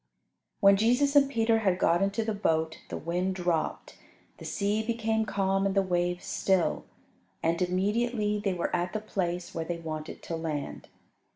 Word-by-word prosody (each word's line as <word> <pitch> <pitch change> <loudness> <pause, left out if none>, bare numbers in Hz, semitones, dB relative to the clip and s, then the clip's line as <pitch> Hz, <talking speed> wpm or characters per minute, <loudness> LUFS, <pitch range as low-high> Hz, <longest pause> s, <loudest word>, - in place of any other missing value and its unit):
When 200 0 +7
Jesus 245 +7 +2
and 280 -1 +6
Peter 225 -3 +2
had 190 -4 +1
got 170 0 +3
into 200 +3 0
the 220 - -1
boat, 160 -5 0
the - - -4
wind 180 +4 -1
dropped, 175 -3 -2 0.4
the - - -9
sea 205 +1 0
became 220 -1 -1
calm 195 0 +1
and 195 0 0
the 195 - +4
waves 175 -1 -1
still, 190 -3 +1 0.6
and 165 +1 +1
immediately 210 +4 0
they 195 -3 0
were 175 - -1
at 175 0 -2
the 215 - -1
place 180 -4 -3
where 165 - -2
they 175 +1 -3
wanted 155 -1 -6
to 165 - -4
land. 155 -3 -4
190 Hz, 170 wpm, -28 LUFS, 175-215 Hz, 0.6 s, When